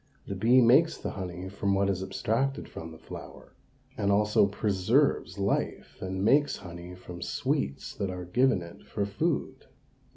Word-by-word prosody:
The - - -4
bee 115 +7 +5
makes 130 +8 +5
the - - -4
honey 90 -1 -5
from 100 0 0
what 100 0 +2
is 95 -2 0
abstracted 115 +8 -1
from 80 0 -8
the 80 - -11
flower, - - -11 0.4
and 100 -5 +1
also 105 0 +4
preserves 100 +2 +1
life 100 0 -2
and 95 +1 -2
makes 145 +4 +4
honey 85 -1 -9
from 90 -1 -10
sweets 70 0 -2
that 100 -2 -1
are 90 -1 -5
given 110 +1 +2
it 85 0 -12
for 100 - -1
food. 150 +11 -2
100 Hz, 160 wpm, -29 LUFS, 90-115 Hz, 0.4 s, bee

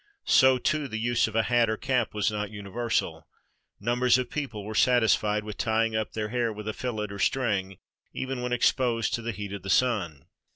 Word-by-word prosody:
So, 130 0 +5
too, 150 +3 0
the 110 -3 -5
use 120 +1 +1
of 110 - -8
a 115 - +3
hat 120 -1 +2
or 110 - -1
cap 125 -4 -1
was 105 0 +1
not 105 -1 -3
universal. 110 +3 -3 0.5
Numbers 120 +3 +3
of 125 - -3
people 125 -9 -4
were 110 - -5
satisfied 110 -3 +3
with 105 -1 -7
tying 110 0 +1
up 110 -1 -2
their 105 -1 -3
hair 120 -1 0
with 105 0 -8
a 110 - -2
fillet 110 -4 -4
or 100 - -7
string, 100 -7 0 0.3
even 130 -1 -4
when 125 0 -3
exposed 120 -1 +1
to 115 - -1
the 115 +1 -3
heat 100 -2 -6
of 100 - -6
the 95 - -7
sun. 95 - +1
110 Hz, 205 wpm, -27 LUFS, 105-125 Hz, 0.5 s, So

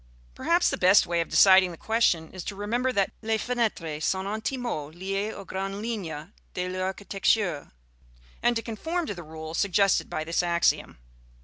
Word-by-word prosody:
Perhaps 345 - +2
the - - -3
best 185 +3 +6
way 170 0 0
of 165 - -4
deciding 190 -1 +6
the 170 - -9
question 200 -8 +1
is 185 -2 -7
to 200 - -4
remember 235 +6 -1
that 200 -5 +1
"les 220 0 0
fenêtres 210 -11 -2
sont 190 +4 0
intimement 220 - -3
liées 195 +4 -2
aux 200 - -9
grandes 195 +2 -4
lignes 195 -7 -5 0.2
de 180 0 -2
l'architecture," 190 -2 -1 0.7
and 240 0 +2
to 230 - -2
conform 320 +10 -3
to 205 - -3
the 175 - -8
rule 160 0 -8
suggested 195 +1 +2
by 155 - -3
this 165 +2 0
axiom. 170 -1 +1
195 Hz, 170 wpm, -27 LUFS, 170-220 Hz, 0.7 s, best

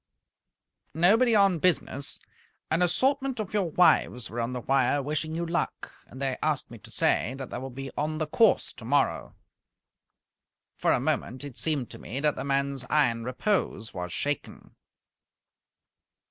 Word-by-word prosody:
"Nobody 220 +8 +4
on 195 -4 +4
business. 145 -5 0 0.5
An 160 +2 +2
assortment 265 +8 +1
of 210 -2 -4
your 200 -5 +1
wives 135 -7 +3
were 120 - -4
on 115 +1 -1
the 125 -1 -4
wire 135 +2 +2
wishing 155 +2 -2
you 170 +1 -2
luck. 170 +1 -3 0.2
They 130 0 -3
asked 150 -5 -1
me 115 - -10
to - - -14
say 125 - +1
that 135 -3 -7
they - - -4
will 135 +1 -6
be 135 +1 -7
on 155 +1 -1
the 155 - -1
course 205 +8 +3
tomorrow." 135 +4 0 1.4
For - - +1
a - - +3
moment 130 +3 -2
it 140 -4 -8
seemed 145 -7 -1
to - - -10
me 125 +6 -5
that 150 0 +1
the - - -4
man's 140 -1 0
iron 120 -7 +2
repose 125 - -1
was 90 -1 -5
shaken. 145 +8 -4
145 Hz, 155 wpm, -27 LUFS, 130-170 Hz, 1.4 s, Nobody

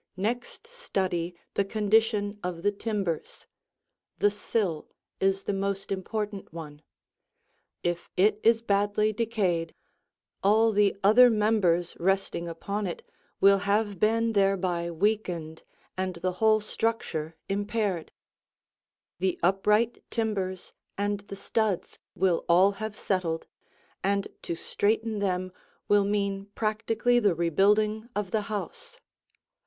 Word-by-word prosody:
Next 235 - -3
study 190 - -2 0.2
the 200 - +2
condition 210 0 +1
of 175 -1 -4
the 205 - +3
timbers. 200 -6 -3 0.7
The 205 - +3
sill 200 -6 -2 0.3
is 195 0 +1
the - - -1
most 195 0 -2
important 205 +1 -3
one. 150 -3 -9 1.0
If 175 0 -2
it 205 +3 +4
is 230 0 +4
badly 205 +1 +1
decayed, 200 -7 -1 0.7
all 220 +3 +4
the 205 -1 +3
other 240 +5 +8
members 210 -6 +2
resting 190 -1 0
upon 200 +5 -3
it 175 - -7 0.3
will 195 0 +6
have 205 0 0
been 225 +2 +2
thereby 185 -4 +1
weakened 170 -3 -1 0.3
and 185 -1 -2
the 180 +2 -1
whole 215 -1 +5
structure 205 -8 -2
impaired. 205 -3 -1 1.1
The 185 0 0
upright 210 +5 +2
timbers 195 -5 -2 0.2
and 205 0 0
the 195 - -6
studs 210 -2 -1 0.2
will 185 -2 +2
all 185 +4 +6
have 215 +1 -5
settled, 175 -6 -1 0.6
and 200 0 +1
to 170 - -4
straighten 220 +5 0
them 185 -2 -1 0.4
will 205 -1 +4
mean 200 -1 -1
practically 225 +2 +1
the 205 -6 +2
rebuilding 210 +7 +2
of 205 -3 -2
the 220 - +1
house. 215 - -6
200 Hz, 115 wpm, -27 LUFS, 185-215 Hz, 1.1 s, other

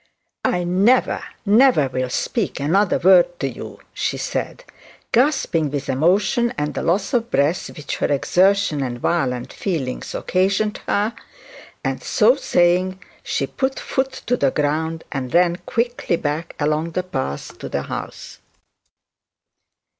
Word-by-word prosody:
'I 180 - +1
never, 195 +9 +2 0.2
never, 215 - +5
will 130 0 -2
speak 185 - -2
another 180 +8 +2
word 175 -1 +4
to 135 - 0
you,' 130 - -8
she - - -2
said, - - -4 0.5
gasping 235 - +2
with 140 -1 -4
emotion 190 - +2
and 150 0 -2
the - - -3
loss 195 +9 0
of 235 -1 +1
breath, 145 +3 +1
which 150 -2 -4
her - - 0
exertion 185 +2 +2
and 125 -2 -3
violent 125 -6 -1
feelings 150 -10 -3
occasioned 195 +3 0
her, 210 +3 +1 0.7
and - - -2
so - - +4
saying 180 +2 +2 0.2
she - - -1
put 265 0 -2
foot 265 0 -2
to 245 - +2
the 140 - +2
ground 160 +3 -1
and 130 -1 -3
ran 175 0 +4
quickly 235 -5 0
back 160 +1 -3
along 155 +2 0
the 185 - -1
path 130 - -4
to - - -6
the - - -2
house. - - -7
175 Hz, 140 wpm, -21 LUFS, 145-200 Hz, 0.7 s, never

